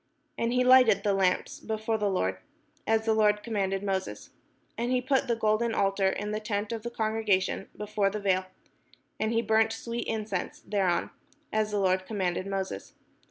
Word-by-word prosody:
And 230 0 -1
he 250 +1 +3
lighted 250 -6 +6
the 205 - +2
lamps 190 -2 0
before 220 0 -2
the 205 -1 +1
Lord; 95 - -1 0.5
as 220 0 +2
the 225 - +3
Lord 210 -1 +3
commanded 195 -4 -1
Moses. 190 -1 -3 0.4
And 240 +2 -2
he 255 - +3
put 260 +1 +1
the 235 - +1
golden 225 +1 +1
altar 195 -1 +2
in 205 +2 -3
the 215 - -1
tent 210 0 -3
of 230 -1 -3
the 235 - -4
congregation 220 -5 0
before 210 -1 0
the 210 +2 -4
vail: 190 -2 +1 0.7
and 220 0 0
he 230 0 +1
burnt 220 0 +3
sweet 230 +1 -4
incense 215 -4 -3
thereon; 190 -4 0 0.4
as 215 0 +1
the 210 - -1
Lord 185 -1 +1
com 220 - -5
manded 185 0 -1
Moses. 195 -1 -4
210 Hz, 180 wpm, -28 LUFS, 195-225 Hz, 0.7 s, lighted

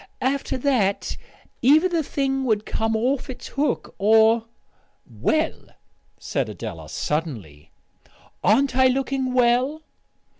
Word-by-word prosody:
After 270 0 -1
that 245 -7 0 0.5
either 305 +8 +5
the 340 -3 0
thing 270 -2 -1
would 215 -3 0
come 225 0 -1
off 250 +5 -1
its 260 - -8
hook, 285 +2 -2
or 220 +2 +4 0.3
" - - -41 0.2
"Well," 315 0 0 0.5
said - - -3
Adela - - -7
suddenly, 115 - -4 0.7
"aren't 265 +6 +3
I 260 0 +5
looking 265 0 -1
well?" 255 +5 +2
255 Hz, 115 wpm, -23 LUFS, 220-275 Hz, 0.7 s, either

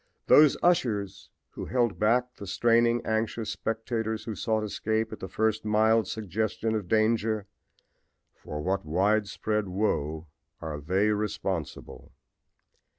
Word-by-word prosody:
Those 150 -2 +6
ushers 110 - 0 0.2
who - - -7
held 120 -5 0
back 125 +3 +1
the 100 - -8
straining, 115 +3 +2
anxious 110 0 -1
spectators 110 -1 -3
who 110 - -5
sought 110 0 -1
escape 110 +1 -2
at - - -8
the 95 - -6
first 110 0 0
mild 110 0 +3
suggestion 110 +2 -2
of 105 -4 -2
danger 110 0 +1 0.9
for 75 0 -7
what 95 +2 -1
widespread 105 +4 0
woe 80 -5 -1 0.3
are 75 -2 -5
they 95 +7 +1
responsible! 95 -5 -4
110 Hz, 120 wpm, -27 LUFS, 100-110 Hz, 0.9 s, Those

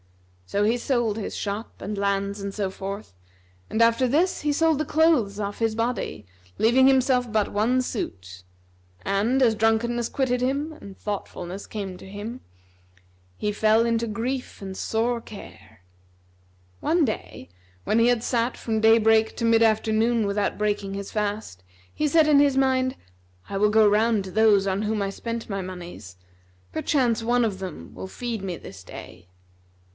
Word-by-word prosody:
So 205 - 0
he 230 +3 +2
sold 240 -4 0
his 215 - -4
shop 205 +2 -5
and 210 0 -5
lands 200 0 -1
and 200 0 -4
so 200 -2 -2
forth, 195 - -7 0.6
and 220 - 0
after 230 +2 +4
this 315 +9 +1
he 295 - +1
sold 320 0 +2
the - - +1
clothes 295 -11 +2
off 205 -1 -4
his 225 -1 0
body, 230 - -2 0.3
leaving 255 +4 +5
himself 255 -2 +3
but 215 -2 0
one 235 +5 +2
suit; 95 - -6 0.6
and, 220 +7 +1
as 230 -3 +4
drunkenness 225 +2 +1
quitted 250 -2 0
him 280 +5 -1
and 200 -10 -12
thoughtfulness 195 -2 -5
came 195 -4 -5
to - - -13
him, 215 +5 -7 1.0
he 210 - -1
fell 220 +2 +3
into 230 0 0
grief 245 +5 -4
and 190 -1 -6
sore 230 +4 -1
care. 115 - -13 1.0
One 335 -1 +2
day, 215 - -5 0.4
when 220 - +2
he 230 - +5
had 240 -2 +2
sat 240 0 0
from 220 -2 -2
day 225 +1 +6
break 220 0 +3
to 230 - -1
mid 230 0 +5
afternoon 220 +1 +2
without 200 0 -1
breaking 205 -2 -1
his 200 0 -6
fast, 205 - -3 0.3
he 305 - 0
said 315 +1 +4
in 295 -2 +6
his 280 -2 +3
mind, 260 -1 +2 0.5
"I 200 - -6
will 210 +2 +3
go 215 0 +5
round 215 0 +3
to 190 - -7
those 210 -1 +4
on 195 +1 0
whom 215 0 -1
I 195 0 -1
spent 230 +2 -5
my 195 -2 -3
monies: 175 - -9 0.6
perchance 240 -6 +1
one 240 +1 +2
of 200 -4 -3
them 180 - -7
will - - -7
feed 230 +1 -5
me 185 -3 -4
this 95 -1 -11
day." 90 0 -11
220 Hz, 170 wpm, -25 LUFS, 200-245 Hz, 1.0 s, day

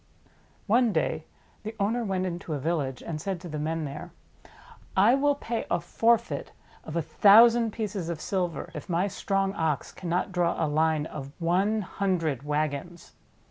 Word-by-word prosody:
One 235 +2 +3
day - - -1 0.4
the 220 +1 -6
owner 225 +4 +1
went 190 -3 -1
into 170 -3 -4
a - - -3
village, 140 -4 -2
and 155 -2 -5
said 190 0 -3
to 180 - -8
the 155 -2 -5
men 160 +1 -2
there: 140 +1 -7 0.9
"I 205 +6 +6
will 285 +1 +3
pay 235 -4 -4
a - - +1
forfeit 235 0 0 0.3
of 160 - -7
a 170 - 0
thousand 225 +6 +6
pieces 205 -6 -4
of 170 -3 -3
silver 180 -1 -2
if - - -8
my 175 +2 +1
strong 195 0 -1
Ox 160 -5 -1
cannot 180 +1 -2
draw 175 -2 +1
a 165 - +1
line 155 0 +1
of 140 -3 -7
one 190 +6 +1
hundred 175 -9 -1
wagons." 150 +3 -3
175 Hz, 165 wpm, -27 LUFS, 155-205 Hz, 0.9 s, I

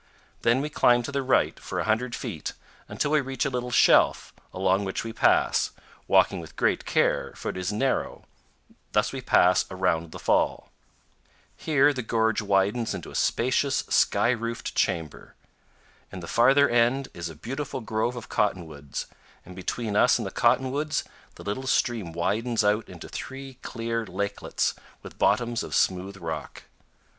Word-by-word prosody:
Then 120 +3 +3
we 150 - -3
climb 120 -3 +4
to 140 - -5
the 140 0 -1
right 130 -1 +1
for - - -5
a - - 0
hundred 115 +3 0
feet 80 - -5 0.4
until 145 - -1
we 155 -1 +4
reach 135 0 -3
a 145 - -1
little 125 -1 -3
shelf, - - +4 0.2
along 95 +1 +1
which 95 -1 -3
we 115 -1 -6
pass, 120 - +3 0.4
walking - - +4
with - - -11
great - - +1
care, - - +1
for - - -5
it - - -4
is 95 +2 -2
narrow; 130 +6 -1 0.7
thus - - +1
we - - -4
pass 90 +1 +4
around 90 -3 -1
the - - -8
fall. - - 0 0.8
Here 145 -1 +3
the 130 - -3
gorge 110 -1 +1
widens 100 +3 +1
into 90 - -8
a - - -11
spacious, 130 +3 +1
sky 115 - +3
roofed 115 -1 -3
chamber. 80 -4 -2 0.8
In 95 - -7
the 85 - -8
farther 135 - +5
end 120 +3 +2
is 85 -1 -5
a 80 - -10
beautiful 130 - -5
grove 110 +2 -1
of 120 - -8
cottonwoods, 80 -8 -2 0.4
and 90 - -11
between 105 +3 -3
us 125 - +5
and 115 - -4
the 95 - -4
cotton 130 +2 +2
woods 150 +2 -1 0.3
the - - -11
little 115 +6 -4
stream 115 -9 0
widens 110 +8 0
out 105 +2 +1
into - - -10
three 135 -1 -8
clear 115 -1 -3
lakelets 100 +2 -2 0.3
with - - -12
bottoms 120 -2 +2
of - - -4
smooth 95 +2 0
rock. 80 -4 -6
115 Hz, 165 wpm, -26 LUFS, 95-130 Hz, 0.8 s, farther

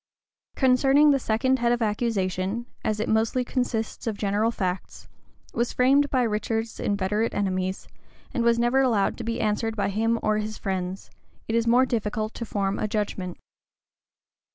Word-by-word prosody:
Concerning 270 +3 +5
the 275 - +3
second 260 +3 +1
head 235 0 +2
of 240 - +1
accusation, 210 -1 -1 0.2
as 215 -1 -1
it 215 - -1
mostly 225 +3 +1
consists 240 -3 -2
of 215 -2 -2
general 205 +2 +1
facts, 185 -5 -4 0.5
was 235 0 -1
framed 275 +3 +4
by 255 -2 +2
Richard's 225 0 -2
inveterate 205 +2 0
enemies, 185 -1 -2 0.5
and 240 - 0
was 235 0 +4
never 240 +3 +3
allowed 225 -7 +2
to - - -4
be 230 +1 -2
answered 220 +1 0
by 200 -2 0
him 225 +3 +1
or 215 0 +2
his 215 0 -4
friends, 190 -1 -4 0.4
it 225 - -2
is 230 0 +1
more 245 +3 +5
difficult 215 -2 -2
to 230 - -5
form 195 -1 -1
a - - 0
judgment. 200 -4 -3
220 Hz, 160 wpm, -25 LUFS, 205-240 Hz, 0.5 s, Concerning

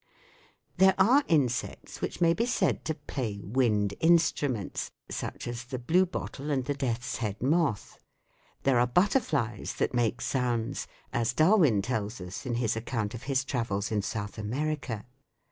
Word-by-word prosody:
There 190 +1 +6
are 255 +9 +5
insects 135 -7 0
which - - -3
may 165 -1 +5
be 230 +7 0
said 250 - +1
to 160 - -1
play 130 -8 -4
wind 105 -3 +1
instruments, 150 - +2 0.2
such - - -4
as 120 0 -5
the 130 +1 -4
blue 170 +10 +3
bottle 150 -4 -5
and 135 -3 0
the 145 - 0
death's 120 -4 -2
head 105 -3 -3
moth. 145 -4 0 0.6
There 135 -3 +4
are 120 - +4
butterflies 155 - +1
that - - 0
make 120 0 +1
sounds, 120 -4 -1 0.3
as 120 0 +1
Darwin 155 - +4
tells 110 -1 -2
us 95 +6 -7
in 120 - -1
his 115 -2 0
account 115 -2 -2
of 120 - -6
his 135 -1 +1
travels 110 -6 -2
in 105 -2 +1
South 105 +1 -4
America. 130 0 -3
125 Hz, 155 wpm, -29 LUFS, 110-150 Hz, 0.6 s, There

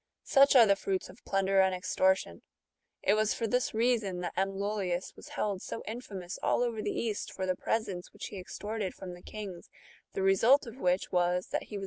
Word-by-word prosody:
Such 275 0 +5
are 240 -3 +9
the 200 -2 +4
fruits 195 -1 -2
of 190 +5 -15
plunder 195 0 +3
and 190 -1 +2
extortion! 185 - +1 0.6
It 200 - +4
was 215 0 +2
for 230 - -2
this 250 +3 +1
reason 220 -5 +1
that 175 - -3
M. 195 +1 0
Lollius 195 -3 -2
^' - - -36
was - - -12
held 200 -3 -2
so - - -6
infamous 200 -6 -6
all - - +2
over 230 -3 -2
the - - -2
East 220 -3 -2
for 190 - -3
the 185 0 0
presents 195 -5 -2
which - - -8
he 200 - -7
extorted 205 +2 -4
from 185 -2 -7
the 175 - -12
kings; 195 -5 -8 0.4
the 190 - -1
result 225 +10 +5
of 230 +1 -9
which 180 -2 +1
was, 180 0 +1
that - - -2
he 210 - -6
was - - -4
195 Hz, 210 wpm, -31 LUFS, 185-220 Hz, 0.6 s, are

